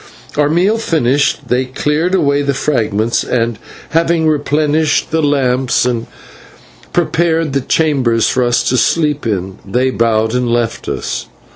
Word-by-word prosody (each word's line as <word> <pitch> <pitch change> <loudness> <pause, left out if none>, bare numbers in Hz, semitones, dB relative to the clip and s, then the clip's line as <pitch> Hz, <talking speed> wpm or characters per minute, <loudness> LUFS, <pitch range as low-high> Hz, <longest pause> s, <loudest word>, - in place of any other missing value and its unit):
Our 145 0 +2
meal 190 +8 +2
finished, 145 - 0
they 125 +2 +1
cleared 150 +7 -1
away 145 -5 +2
the 140 -1 -1
fragments, 115 -5 0
and, 115 -3 -1 0.3
having 165 0 +1
replenished 150 +1 +1
the 160 0 +1
lamps 130 -4 +1
and 120 -2 -1 0.8
prepared 165 -3 0
the 140 - +1
chambers 130 -7 +1
for 130 - +1
us 120 0 +1
to 130 - +1
sleep 150 -2 +1
in, 95 -3 -3
they 125 +6 0
bowed 110 -2 +1
and 125 -1 0
left 115 -1 -1
us. - - -4
140 Hz, 140 wpm, -15 LUFS, 120-155 Hz, 0.8 s, Our